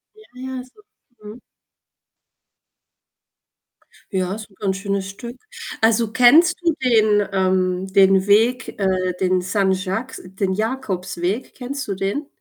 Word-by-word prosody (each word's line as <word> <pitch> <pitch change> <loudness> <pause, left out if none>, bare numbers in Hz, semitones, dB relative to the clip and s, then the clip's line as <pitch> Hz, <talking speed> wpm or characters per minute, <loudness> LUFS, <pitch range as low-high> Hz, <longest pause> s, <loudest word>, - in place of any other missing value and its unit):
Ja, 435 - -17 0.2
ja, 260 -1 -5
so 260 +11 -22 0.4
mhm. 210 +4 -10 2.7
Ja, 185 0 -1
ist 215 0 -9
'n 195 - -23
ganz 195 -2 -1
schönes 195 -1 -3
Stück. 235 +5 -9 0.4
Also, 225 0 +2
kennst 315 +9 +6
du 335 - +2
den, 215 -4 +3
ähm 185 -1 +1
den 195 -1 +4
Weg 230 +6 +2
äh, 185 -2 0
den 185 -1 +2
Saint-Jacques 190 +5 -1
den 190 +1 -3
Jakobsweg? 200 -2 -3
Kennst 270 +1 -5
du 200 - -1
den? 200 +10 -3
200 Hz, 120 wpm, -21 LUFS, 190-245 Hz, 2.7 s, kennst